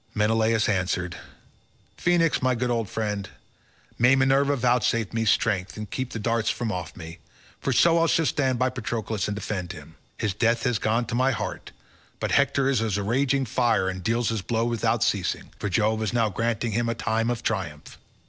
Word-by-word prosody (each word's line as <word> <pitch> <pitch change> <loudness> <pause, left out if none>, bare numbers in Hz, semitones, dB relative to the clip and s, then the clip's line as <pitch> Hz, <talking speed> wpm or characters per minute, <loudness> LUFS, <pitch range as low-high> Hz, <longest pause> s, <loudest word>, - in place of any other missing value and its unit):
Menelaus 110 +1 +2
answered, 90 -3 -1 0.8
"Phoenix, 170 -3 +2
my 130 -1 +2
good 125 +1 -1
old 115 -3 -1
friend, 105 -3 -3 0.7
may 125 +3 +6
Minerva 135 +1 +3
vouchsafe 120 -3 +1
me 115 0 0
strength 100 -3 +1
and 105 -2 -7
keep 130 -1 -3
the - - -6
darts 115 +1 0
from 120 -3 -2
off 90 -3 -5
me, 80 +1 -9 0.4
for 135 - -1
so 165 +5 +4
shall 165 - +2
I - - -1
stand 130 -4 +1
by 130 +1 +1
Patroclus 110 -4 -3
and 105 - -2
defend 95 -3 -4
him; - - -12 0.2
his 105 -3 -1
death 115 +3 +1
has 120 -4 +1
gone 115 +3 +1
to 110 - -6
my 130 +2 +3
heart, - - -4 0.5
but - - -2
Hector 135 -1 +3
is 135 -5 +2
as 110 -3 0
a 100 - -2
raging 135 +5 +1
fire 115 -6 +1
and 95 0 -5
deals 115 +3 +1
his 110 -2 -2
blows 115 +3 -1
without 115 -3 +1
ceasing, - - -1
for 100 - -2
Jove 110 +2 +1
is 110 +1 -1
now 115 -2 +2
granting 115 +2 -1
him 115 +2 0
a 115 - -1
time 115 0 0
of 120 -1 -2
triumph." 85 -9 -4
115 Hz, 195 wpm, -25 LUFS, 105-125 Hz, 0.8 s, may